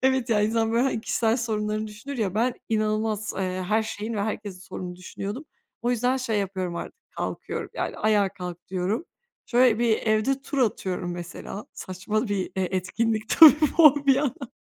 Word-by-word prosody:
Evet 265 -1 +2
ya 215 -2 +3
insan 225 +1 +1
böyle 235 +1 +3
hani 260 -4 0
kişisel 225 +1 +1
sorunlarını 215 -2 -2
düşünür 225 +6 -8
ya, 195 -5 -1
ben 240 +3 +1
inanılmaz, 215 -1 0
eee, - - -1 0.3
her 220 +1 +3
şeyin 220 +1 -5
ve 210 - -1
herkesin 205 -3 -4
sorununu 180 -1 -7
düşünüyordum. 200 +8 -6 0.4
O 240 - +1
yüzden 245 +2 +1
şey 235 -5 -1
yapıyorum 190 -3 -3
artık, 460 - -8
kalkıyorum, - - -5
yani - - -3
ayağa 210 -2 +2
kalk 180 -3 -8
diyorum. 190 - -1 0.4
Şöyle 245 -2 +4
bir 230 -2 +3
evde 225 +5 +1
tur 280 0 -4
atıyorum 185 -6 -1
mesela. 175 +4 -7
Saçma 210 +5 -3
bir, 205 - 0
eee 185 - -2
e 190 0 0
etkinlik 220 +4 -1
tabii 315 -4 +10 0.3
bu 295 -3 +7
bir 270 - +7
yandan. 270 -2 -2
215 Hz, 175 wpm, -25 LUFS, 195-240 Hz, 0.4 s, tabii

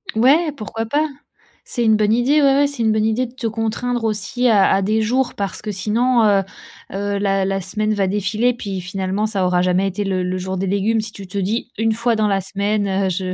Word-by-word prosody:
Ouais, 290 +8 +4
pourquoi 225 -3 -5
pas. 295 +7 +1 0.6
C'est 240 - -2
une 220 -1 +4
bonne 210 0 +2
idée, 265 +6 +3
ouais, 275 -1 +5
ouais, 285 +1 +4
c'est 280 -5 -4
une 220 - +3
bonne 215 0 +1
idée 225 +3 +1
de 240 - -12
te 250 -3 -3
contraindre 225 +2 -2
aussi 220 +4 -1
à 205 -5 +4
à 195 - +3
des 215 +3 +1
jours. 250 +4 0
Parce 200 -3 -4
que 210 - -3
sinon, 225 +5 +1
heu, 200 -2 +4 0.5
heu, 200 +1 -2
la 195 -1 +1
la 195 0 -1
semaine 215 +3 -1
va 195 -2 +1
défiler 210 +5 0
puis 200 -5 -5
finalement 190 +3 -2
ça 200 -4 -1
aura 180 0 +2
jamais 185 +2 +2
été 195 +2 -3
le 185 -2 -1
le 180 +1 -2
jour 190 +1 -4
des 195 +1 -2
légumes. 205 +4 +1
Si 215 0 -7
tu 200 -2 -10
te 185 - -6
dis 220 +5 -2
une 225 0 +1
fois 235 +1 0
dans 215 -1 +1
la 195 -1 +1
semaine, 200 +2 -1
heu, 195 0 0
je 185 0 -2
210 Hz, 240 wpm, -20 LUFS, 195-230 Hz, 0.6 s, ouais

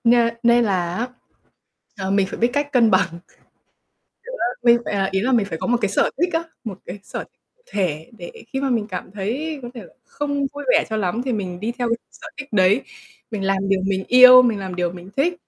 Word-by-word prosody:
Nê 235 0 +4
nên 235 0 +4
là 180 -4 -1
á, 240 +2 -2 0.9
ờ, 190 -1 -3
mình 200 -1 +2
phải - - -7
biết 235 +1 +3
cách 285 0 -1
cân 235 -4 +4
bằng. 190 0 +3 0.2
Kiểu, - - -28 1.0
á, - - +2
mình 235 0 +6
phải, - - -3
à, 195 -1 +1
ý 190 - +1
là 255 +5 0
mình 225 -5 +3
phải 165 -5 -5
có - - -3
một 245 - +2
cái 205 - +1
sở - - +2
thích 350 +3 +1
á, 325 0 0 0.2
một 195 -5 -6
cái 185 - -7
sở - - -6 0.4
thể 165 - -3
để 175 - -9 0.2
khi 270 - -3
mà 275 -1 -1
mình 225 -4 0
cảm 185 -1 -6
thấy 255 +11 -3
có 240 - -6
thể 235 - -8
là - - -17
không 285 0 -2
vui 290 0 -7
vẻ - - +4
cho 220 - -2
lắm 210 +3 -1
thì 255 - -1
mình 185 -5 -4
đi 225 +3 -2
theo 240 -1 0
cái 230 - +1
sở - - -13
thích 275 -1 -7
đấy. 200 +4 +4 0.5
Mình 215 -3 -4
làm 195 0 0
điều 195 -1 +2
mình 190 -1 -1
yêu, 255 0 +9
mình 230 -4 +1
làm 190 -2 -5
điều 175 -1 -1
mình 180 +2 -11
thích, 330 +6 +2
215 Hz, 240 wpm, -21 LUFS, 190-250 Hz, 1.0 s, yêu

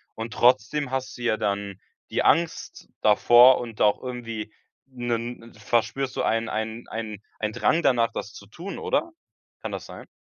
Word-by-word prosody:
Und 115 +1 -5
trotzdem 125 +4 +2
hast 130 0 -4
du 120 - -8
ja 115 -2 +2
dann 100 -2 -3 0.3
die - - 0
Angst 170 0 +1
davor 120 +4 +7
und 115 -3 -7
auch 105 -1 +3
irgendwie 115 -4 -6 0.3
'nen 120 -2 -3
'ne 115 +1 -15
verspürst 120 +5 -1
du - - -1
ein 115 +1 +1
ein 110 +2 -4
ein 110 -2 -6 0.2
ein 105 0 -1
Drang 160 +9 +2
danach, 115 -3 +3
das 105 - -5
zu 100 - -12
tun, 175 - -8
oder? 450 -6 -1 0.5
Kann - - -5
das - - -5
sein? - - -11
115 Hz, 170 wpm, -25 LUFS, 110-125 Hz, 0.5 s, davor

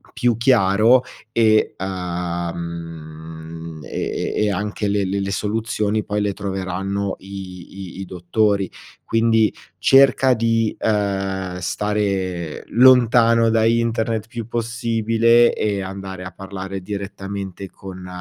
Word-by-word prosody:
più 120 -2 +2
chiaro 115 0 +4 0.3
e, 110 -2 +3
uhm, 85 -3 -5
e - - -3
e - - +2
e 105 - +1
anche 105 +1 -2
le 100 0 +1
le 95 +1 -1
le 100 0 -2
soluzioni 110 +1 -1
poi 105 0 -1
le 105 -1 +1
troveranno 95 0 -3
i 95 -1 -9
i - - -8
i 95 - -4
dottori. 95 +2 0 0.3
Quindi 115 -1 +2 0.2
cerca 130 +4 +5
di, 115 -1 +1
ehm, 95 -3 -1
stare 95 -4 -2
lontano 115 -2 +5
da 110 0 +3
internet 115 -1 +1
il 110 - -31
più 120 -3 -6
possibile, 115 0 +2
e 100 -2 -1
andare 95 -1 -6
a 95 - -7
parlare 95 0 -6
direttamente 100 -1 -6
con 95 -1 -10
100 Hz, 120 wpm, -21 LUFS, 95-115 Hz, 0.3 s, cerca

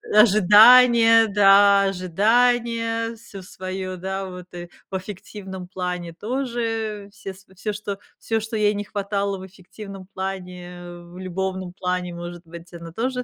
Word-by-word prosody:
ожидания, 225 +3 +7
да, 200 0 +5
ожидания, 230 +4 +1
всё 210 -3 -12
своё, 185 0 -6
да, 190 +2 -4
вот, 180 -1 -9
и 175 0 -8 0.2
в - - -4
аффективном 190 -1 -8
плане 180 -2 -5
тоже, 225 -3 -3
все 195 -1 -8
св 190 0 -21
всё, 210 +1 -3
что 205 -1 -5 0.2
всё, 225 0 -1
что 220 +1 -6
ей 210 0 +2
не 205 - -3
хватало 200 -1 -3
в 190 - -9
эффективном 195 +1 -11
плане, 180 -2 -6 0.3
в 175 +1 -13
любовном 185 0 -4
плане, 180 -1 -3
может 175 0 -8
быть, 170 +1 -12
она 165 -1 -9
тоже 250 +3 -2
195 Hz, 140 wpm, -22 LUFS, 180-220 Hz, 0.3 s, ожидания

